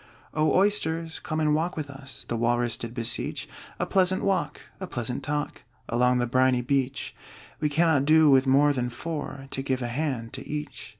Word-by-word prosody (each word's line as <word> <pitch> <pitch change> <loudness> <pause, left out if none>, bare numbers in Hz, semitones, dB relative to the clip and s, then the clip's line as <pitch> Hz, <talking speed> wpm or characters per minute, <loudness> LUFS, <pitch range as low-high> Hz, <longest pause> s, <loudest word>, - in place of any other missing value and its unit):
"O 155 0 +2
Oysters, 165 -5 +1
come 155 - -3
and 150 -1 +2
walk 165 +3 0
with 150 -2 -3
us!" 135 -1 -8
The 120 - -2
Walrus 120 0 +1
did 115 +1 -7
beseech. 115 -2 -2 0.3
"A - - -1
pleasant 185 0 +2
walk, 195 -1 0 0.2
a 190 - -5
pleasant 125 -5 -3
talk, 150 0 -3 0.3
Along 125 +1 +2
the 120 - +1
briny 130 +1 +3
beach: 135 +1 -1 0.4
We 150 - +1
cannot 155 -2 +3
do 155 +1 +6
with 135 -1 +5
more 145 +2 +5
than 125 -2 -1
four, 145 0 -5
To 135 - -2
give 130 -2 -1
a - - -1
hand 125 -4 -3
to - - -7
each." 150 -4 -5
140 Hz, 185 wpm, -26 LUFS, 125-155 Hz, 0.4 s, do